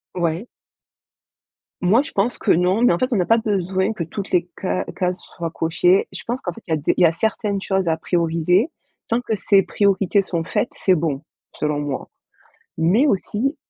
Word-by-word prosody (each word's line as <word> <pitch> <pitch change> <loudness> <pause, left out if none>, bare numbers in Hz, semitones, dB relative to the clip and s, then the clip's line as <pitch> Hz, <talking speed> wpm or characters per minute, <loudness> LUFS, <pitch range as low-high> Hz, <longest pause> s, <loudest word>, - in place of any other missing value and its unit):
Ouais. 175 +4 -1 1.3
Moi 195 +8 +4
je 295 - -7
pense 205 +5 0
que - - +2
non, 180 +5 +2
mais 245 - +5
en 170 - +2
fait, 255 +6 0
on - - +2
n'a 180 - +2
pas 225 +6 +4
besoin 195 -2 0
que 185 - -3
toutes 195 +5 -6
les 180 0 +1
ca 185 - -1
cases 180 -1 -1 0.2
soient 170 -1 -4
cochées. 175 +3 +2
Je - - -8
pense 245 +3 -3
qu'en - - -3
fait, 230 - -12
il - - -6
y - - +4
a - - +2
des 145 - +1
il - - +1
y - - +8
a 165 - +4
certaines 205 +1 -1
choses 190 -2 0
à 160 -1 +2
prioriser. 170 - +1 0.4
Tant 230 +2 0
que 225 -3 -2
ces 200 -1 +3
priorités 200 0 +2
sont 170 -3 -2
faites 180 - -1
c'est 185 - +5
bon, 155 -4 -1 0.3
selon 150 -1 -1
moi, 145 -2 -4 0.7
mais 185 - +3
aussi 245 - 0
185 Hz, 205 wpm, -21 LUFS, 170-215 Hz, 1.3 s, y